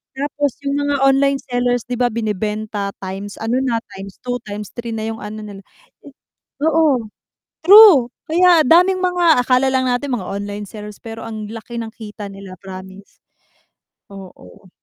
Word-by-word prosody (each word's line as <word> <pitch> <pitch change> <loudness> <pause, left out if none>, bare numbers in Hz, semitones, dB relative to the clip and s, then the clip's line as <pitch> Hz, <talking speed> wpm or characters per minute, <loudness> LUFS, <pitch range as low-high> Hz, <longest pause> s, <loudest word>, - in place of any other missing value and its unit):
tapos 285 0 -1
yung 280 +1 0
mga 285 0 0
online 275 0 +3
sellers, 245 -1 0
di 245 - -2
ba, 245 - +3
binebenta 210 -2 -3
times 195 +2 -6
ano 230 +3 0
na, 230 -3 0 0.2
x2, 200 +6 -6
x3 210 +3 -6
na 220 0 -3
yung 225 - -5
ano 215 +1 -7
nila. 200 -2 -9 1.0
Oo 300 -8 +2 0.6
true, 380 - +9 0.2
kaya 350 0 +5
daming 360 +5 +4
mga 350 -7 +3
akala 255 +1 +3
lang 260 0 +1
natin 250 +2 -1
mga 190 -7 -3
online 205 0 -5
sellers 210 -1 -9
pero 225 0 -8
ang 215 -2 -6
laki 230 +1 -8
ng 220 -1 -7
kita 210 -2 -8
nila 195 -1 -10
promise. 190 +1 -11 1.0
Oo. 185 - -14
230 Hz, 145 wpm, -19 LUFS, 205-275 Hz, 1.0 s, true